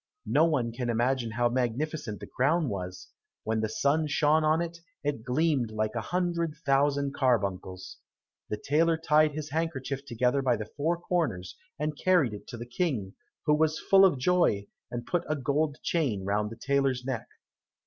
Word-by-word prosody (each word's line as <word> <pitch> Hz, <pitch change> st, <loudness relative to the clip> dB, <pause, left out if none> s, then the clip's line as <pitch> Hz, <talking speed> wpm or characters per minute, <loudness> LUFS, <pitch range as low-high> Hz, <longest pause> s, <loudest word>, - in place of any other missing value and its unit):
No 155 Hz, +3 st, +4 dB
one 130 Hz, -8 st, +1 dB
can 120 Hz, +1 st, -3 dB
imagine 120 Hz, +1 st, +1 dB
how 120 Hz, +2 st, +1 dB
magnificent 125 Hz, -1 st, -2 dB
the 100 Hz, -, -7 dB
crown 145 Hz, +7 st, +1 dB
was; 90 Hz, -3 st, -6 dB, 0.3 s
when 110 Hz, 0 st, 0 dB
the 110 Hz, -, -1 dB
sun 145 Hz, +7 st, +1 dB
shone 150 Hz, +1 st, +3 dB
on 155 Hz, +1 st, +3 dB
it, 170 Hz, 0 st, -4 dB, 0.2 s
it 145 Hz, -5 st, -1 dB
gleamed 130 Hz, -1 st, +1 dB
like 110 Hz, 0 st, -2 dB
a 115 Hz, -, -2 dB
hundred 170 Hz, 0 st, -1 dB
thousand 140 Hz, 0 st, +2 dB
carbuncles. 100 Hz, -8 st, -1 dB, 0.5 s
The 105 Hz, -, -2 dB
tailor 160 Hz, +8 st, +2 dB
tied 155 Hz, -1 st, +3 dB
his 150 Hz, -1 st, -5 dB
handkerchief 140 Hz, -4 st, -2 dB
together 125 Hz, +1 st, +1 dB
by 130 Hz, -3 st, +2 dB
the 105 Hz, -, -5 dB
four 160 Hz, +4 st, 0 dB
corners, 165 Hz, -, -2 dB, 0.2 s
and 150 Hz, 0 st, -2 dB
carried 155 Hz, -8 st, +2 dB
it 105 Hz, -, -9 dB
to 120 Hz, -, -7 dB
the 120 Hz, -, -6 dB
King, 120 Hz, -, -2 dB, 0.3 s
who 150 Hz, -, +4 dB
was 155 Hz, +1 st, +2 dB
full 195 Hz, 0 st, +5 dB
of 185 Hz, -7 st, +5 dB
joy, 130 Hz, -, +2 dB, 0.2 s
and 120 Hz, 0 st, -5 dB
put 175 Hz, -, 0 dB
a 155 Hz, -, +1 dB
gold 145 Hz, +2 st, 0 dB
chain 125 Hz, -, 0 dB
round 105 Hz, +1 st, 0 dB
the 115 Hz, -, -8 dB
tailor's 135 Hz, 0 st, 0 dB
neck. 130 Hz, -3 st, -3 dB
140 Hz, 175 wpm, -28 LUFS, 115-155 Hz, 0.5 s, full